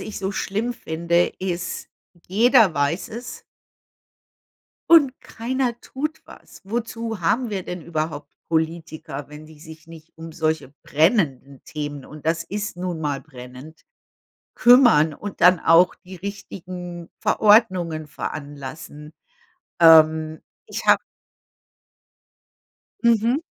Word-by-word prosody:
ich 215 - -6
so 195 0 -3
schlimm 215 +5 -2
finde, 170 -3 0
ist, 180 -1 -4 0.4
jeder 220 -1 +5
weiß 145 +5 -1
es 235 +3 -8 1.5
und 290 -6 +7
keiner 240 0 -3
tut 305 +4 -5
was. - - -15
Wozu 230 0 -4
haben 220 +9 +1
wir 195 -3 -3
denn 180 0 -6
überhaupt 155 -2 -4 0.2
Politiker, 160 -3 -3
wenn 150 +1 -12
die 155 -1 -16
sich 160 0 -13
nicht 165 -1 -14
um 165 0 -9
solche 155 -4 -2
brennenden 145 - 0
Themen, 145 -2 -6
und 155 0 -12
das 165 +1 +1
ist 205 +1 -5
nun 175 -2 -4
mal 145 -3 -2
brennend, 130 +2 -13 0.7
kümmern 240 - +6
und 205 +4 -8
dann 180 -1 +6
auch 170 +3 +5
die 185 0 -13
richtigen 180 -2 -8
Verordnungen 180 -8 +3
veranlassen. 150 +1 -8 0.7
Ähm, 160 -1 +6 0.3
ich - - -6
habe - - +6 2.0
Mhm. 235 +4 +3
170 Hz, 110 wpm, -22 LUFS, 155-205 Hz, 2.0 s, und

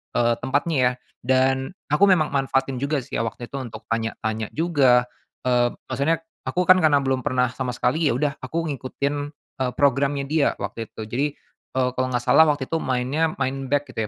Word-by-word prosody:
eee, 120 0 +3
tempatnya 145 +5 0
ya. 125 0 +4 0.3
Dan 130 +5 +1 0.2
aku 175 +7 +5
memang 170 -6 +3
manfaatin 135 -1 0
juga 140 -1 -1
sih - - -4
ya - - +2
waktu 120 +1 -7
itu 140 - -4
untuk 120 -4 -8
tanya-tanya 110 -1 -2
juga, 140 -7 +4 0.4
eee, 120 -1 +2 0.2
maksudnya 165 +3 0 0.2
aku 180 - +1
kan 185 +1 +6
karena 145 -4 +4
belum 130 -1 +1
pernah 125 0 0
sama 125 -2 -4
sekali, 150 +7 +1
ya 120 - +2
udah 140 +1 -1
aku 165 +6 -3
ngikutin, 140 +1 -3 0.4
eee, 130 -1 0
programnya 140 0 +2
dia 150 +1 +1
waktu 115 -2 -5
itu. - - -10
Jadi, 120 +6 -1 0.5
eee, 130 -1 +2
kalau 130 0 -1
nggak 120 -1 -1
salah 140 +6 +6
waktu 145 -2 +1
itu 160 +5 -2
mainnya 135 +5 0
main 135 0 -2
back 145 +1 0
gitu 110 -1 -2
135 Hz, 190 wpm, -23 LUFS, 125-145 Hz, 0.5 s, kan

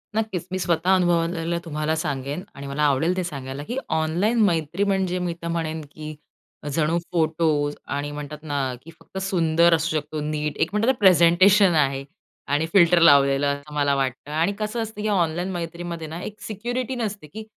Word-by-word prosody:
नक्कीच. 205 -6 -2
मी 185 - -2
स्वतः 175 +2 +2
अनुभवलेलं 170 -1 +1
तुम्हाला 155 0 -1
सांगेन 145 +2 -3
आणि 140 0 -8
मला 145 +2 -2
आवडेल 160 +6 +1
ते 185 - 0
सांगायला, 140 -3 -6
की 245 - -5
ऑनलाईन 175 +9 +1
मैत्री 170 +1 0
म्हणजे 190 -2 0
मी 175 -1 -2
तर 170 - -4
म्हणेन, 160 -1 -2
की 155 0 -8 0.6
जणू 160 +2 +1
फोटोज 155 -3 +1 0.2
आणि 145 +1 -3
म्हणतात 150 +1 -7
ना, 140 -4 -2
की 165 - -12
फक्त - - -12
सुंदर 170 -3 +3
असू 160 0 -1
शकतो 150 +1 -4
नीट. 150 0 -3
एक 165 - +1
म्हणतात 215 +3 +1
ना 260 - -5
प्रेझेंटेशन 185 +1 +6
आहे 135 -2 +1 0.5
आणि 150 +2 +2
फिल्टर 175 -2 +6
लावलेलं. 140 -3 +5
असं 145 +1 -12
मला 145 -1 +2
वाटतं. 135 +1 -3
आणि 165 +6 +1
कसं 215 +2 -2
असतं, 220 -1 -7
की 215 - -1
ऑनलाईन 175 -2 0
मैत्रीमध्ये 170 -1 -5
ना 165 +3 -7
एक 210 0 -8
सिक्युरिटी 245 +4 -3
नसते, 210 -8 -4
की 215 +7 -9
165 Hz, 175 wpm, -23 LUFS, 150-185 Hz, 0.6 s, प्रेझेंटेशन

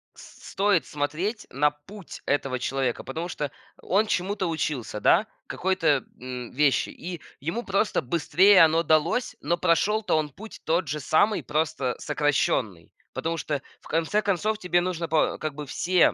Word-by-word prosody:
с - - -13
стоит 195 -4 +2
смотреть 155 +10 -3
на 145 +3 +3
путь 160 +6 -12
этого 135 -2 0
человека, 130 -1 -1
потому 160 +7 -4
что 150 -5 -4 0.3
он 205 +4 +2
чему-то 190 0 -1
учился, 150 -9 -2
да, 215 - +4 0.2
какой-то, 170 -7 +1 0.2
м, 125 -1 -6
вещи, 140 0 +2
и 175 -1 -7 0.2
ему 170 - -3
просто 200 -2 +1
быстрее 170 +7 +5
оно 165 +1 +4
далось, 160 +10 +1
но 170 +5 0
прошел-то 185 +4 +2
он 155 -1 -1
путь 215 +10 -11
тот 165 +1 +1
же 150 +3 -2
самый, 200 +10 +2
просто 150 -4 -1
сокращенный. 120 - 0 0.2
Потому 165 +1 -2
что, 145 -2 -2 0.2
в - - -15
конце 165 +6 +1
концов, 210 +2 0
тебе 180 -3 +2
нужно 175 -2 -2
по 155 0 +2
как 155 -1 -4
бы 150 0 -6
все 180 +6 +3
160 Hz, 155 wpm, -26 LUFS, 145-185 Hz, 0.3 s, быстрее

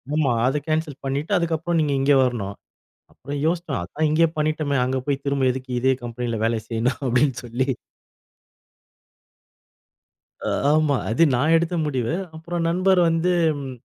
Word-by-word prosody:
ஆமா. 150 -5 +2 0.2
அத 135 +3 +1
கேன்சல் 155 -3 -2
பண்ணிட்டு 140 +6 -2
அதுக்கு 170 -1 0
அப்புறம் 170 +1 -1
நீங்க 150 -2 0
இங்க 140 +2 +4
வரணும். 105 -6 -2 0.6
அப்புறம் 140 +2 -6
யோசிச்சோம். 165 -5 -1
அதான் 150 - -1
இங்கேயே 165 +2 +4
பண்ணிட்டோமே, 150 -2 0
அங்க 130 +1 -1
போய் 140 -1 -2
திரும்ப 140 -1 0
எதுக்கு 130 0 -7
இதே 130 +1 +3
கம்பெனியில 120 -1 -3
வேல 115 0 +1
செய்யணும் 120 +3 -1
அப்டின் 130 +2 +2
சொல்லி 120 +2 -2 2.8
ஆ, - - 0 0.2
ஆமா, 155 -2 +3
அது 120 +9 +2
நான் 150 +7 +3
எடுத்த 170 +1 0
முடிவு. 130 0 -1 0.2
அப்புறம் 170 +1 -3
நண்பர் 185 +1 +3
வந்து 165 +2 +1 0.3
ம். 135 -2 -6
145 Hz, 145 wpm, -23 LUFS, 125-160 Hz, 2.8 s, இங்க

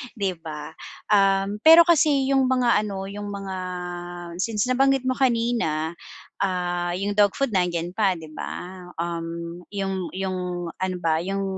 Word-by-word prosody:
'di 200 -3 0
ba. 155 -2 -7 0.4
Um, 195 0 +3
pero 325 +6 +9
kasi 290 -5 +3
yung 270 -1 +4
mga 240 -5 +2
ano, 195 -1 -4
yung 205 +1 -6
mga 195 -1 -5 0.8
since 210 +1 0
nabanggit 270 0 +3
mo 255 - +1
kanina, 230 - +1 0.5
ah, 175 -2 -1
yung 200 +2 -2
dog 205 -1 +4
food 275 -3 +1
nandiyan 175 -2 0
pa 195 -4 +2
di 160 - -10
ba, 180 +4 -7 0.2
um, 170 0 -4
yung 195 -2 -2
yung 180 -2 -3
ano 185 0 -1
ba, 160 -1 +2
yung, 195 +1 -2
195 Hz, 145 wpm, -24 LUFS, 175-230 Hz, 0.8 s, pero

